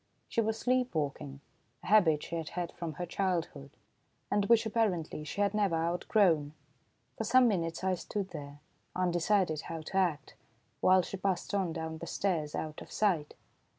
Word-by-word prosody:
She 230 - +1
was 220 0 -1
sleep 250 -2 0
walking, 140 -2 -3 0.4
a - - -11
habit 180 -8 +4
she - - -5
had 165 -1 -3
had 175 -1 -4
from 165 -2 -5
her 175 +5 -4
childhood, 170 -6 -2 0.6
and 205 -1 +2
which 230 +1 +4
apparently 195 -9 0
she 155 +7 -4
had 200 0 +2
never 200 -5 +2
outgrown. 165 -2 +2 0.7
For - - 0
some 250 +3 +5
minutes 170 -5 -1
I 190 0 +2
stood 195 +2 -4
there, 145 -2 -8 0.3
undecided 175 -2 +1
how 165 -1 -6
to 175 +5 -4
act, 170 -7 0 0.5
while 185 0 +5
she 195 - -5
passed 190 0 -1
on 190 -4 +1
down 160 -1 -5
the 170 - -7
stairs, 165 -7 -1
out 155 -1 -4
of - - -11
sight. 175 -8 0
175 Hz, 170 wpm, -31 LUFS, 160-200 Hz, 0.7 s, some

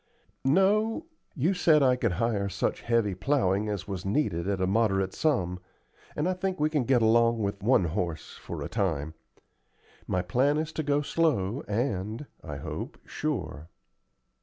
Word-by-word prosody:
"No; 210 - +2 0.3
you 160 +7 +2
said 160 -5 +4
I 130 -1 +5
could 115 -6 0
hire 100 0 0
such 100 +1 -2
heavy 115 -4 +1
plowing 100 -1 +1
as 100 -3 -4
was 95 -3 -4
needed 95 - 0
at 100 -1 0
a 95 - +2
moderate 95 -2 +1
sum, 90 - 0 0.6
and 150 +3 0
I 185 - +1
think 185 0 -3
we 155 +1 +2
can 145 -6 +1
get 125 -2 +3
along 115 +1 +4
with 100 -2 -2
one 115 -1 +4
horse 85 -1 -3
for - - -6
a - - -3
time. 80 -8 -1 0.9
My 90 -1 0
plan 130 +11 +2
is 155 +1 -2
to - - -2
go 145 0 +1
slow, 140 - +1
and, 110 +2 -2 0.2
I 75 -3 -6
hope, - - -6
sure." 90 - -4
115 Hz, 160 wpm, -28 LUFS, 95-145 Hz, 0.9 s, I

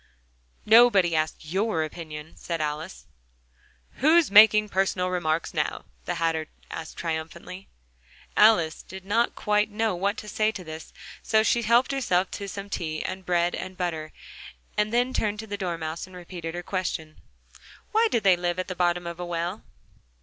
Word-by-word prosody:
"Nobody 215 -7 +6
asked 155 0 -1
your 190 +1 0
opinion," 155 -1 -8
said 170 -1 -4
Alice. 155 +4 -4 0.9
"Who's 315 0 +4
making 215 0 +7
personal 185 -1 0
remarks 165 -2 -1
now?" - - -2 0.2
the - - -2
Hatter 165 -1 -1 0.2
asked 160 -1 -7
triumphantly. 170 +3 -5 0.7
Alice 210 -7 +4
did 190 0 -11
not 230 +4 +1
quite 210 0 +1
know 220 0 0
what 200 +3 -1
to 210 - -8
say 215 +1 +1
to 190 - -7
this: 160 -1 -9 0.3
so 220 -1 +3
she 235 +1 +2
helped 235 +4 +3
herself 195 -9 +1
to 200 - -5
some 200 +1 -6
tea 155 -5 -3
and 185 0 -5
bread 175 0 +2
and 185 0 -6
butter, 160 -4 -3 0.6
and 210 0 +1
then 245 +2 +1
turned 210 -3 0
to 220 - -6
the 205 -2 -4
Dormouse, 170 -4 -4
and 185 - -14
repeated 175 -2 -7
her 175 - -5
question. 165 -4 -4 0.7
"Why 450 +2 +4
did 230 - 0
they 190 -2 +6
live 175 0 -2
at 185 - -3
the 185 - -4
bottom 175 0 +1
of 170 0 -6
a 175 - -4
well?" 175 +4 -3
185 Hz, 165 wpm, -26 LUFS, 165-210 Hz, 0.9 s, making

